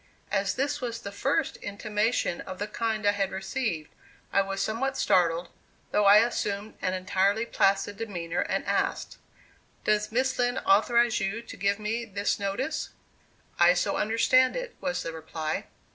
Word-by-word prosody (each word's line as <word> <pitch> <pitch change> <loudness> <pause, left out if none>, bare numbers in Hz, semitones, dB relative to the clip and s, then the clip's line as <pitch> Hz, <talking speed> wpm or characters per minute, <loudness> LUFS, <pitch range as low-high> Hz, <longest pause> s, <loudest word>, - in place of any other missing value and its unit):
As 195 -1 0
this 275 +3 -1
was 235 -2 -3
the 200 - -7
first 275 +8 0
intimation 210 -2 -1
of 185 - -7
the 205 - -2
kind 215 0 -2
I 205 - +6
had 200 -2 -1
received, 190 -5 -3 0.4
I 195 - +5
was 195 0 -3
somewhat 230 +7 -1
startled, 170 -1 +2 0.4
though 210 - +3
I 210 +3 +8
assumed 210 -3 -3
an 185 - 0
entirely 195 +4 +1
placid 200 -2 +1
demeanor, 175 -6 -3
and - - -1
asked: - - -1 0.7
"Does 210 0 +1
Miss 260 +3 0
Lind 245 +1 +1
authorize 235 +4 +4
you 200 +4 -2
to - - -10
give 200 +2 +1
me 220 +2 -2
this 205 -1 -1
notice?" 205 +10 -2 0.7
"I 175 +1 +6
so 195 +3 0
understand 255 +4 +3
it," - - -5
was 270 -2 -2
the 165 - -4
reply. 160 -1 -4
205 Hz, 160 wpm, -27 LUFS, 195-235 Hz, 0.7 s, I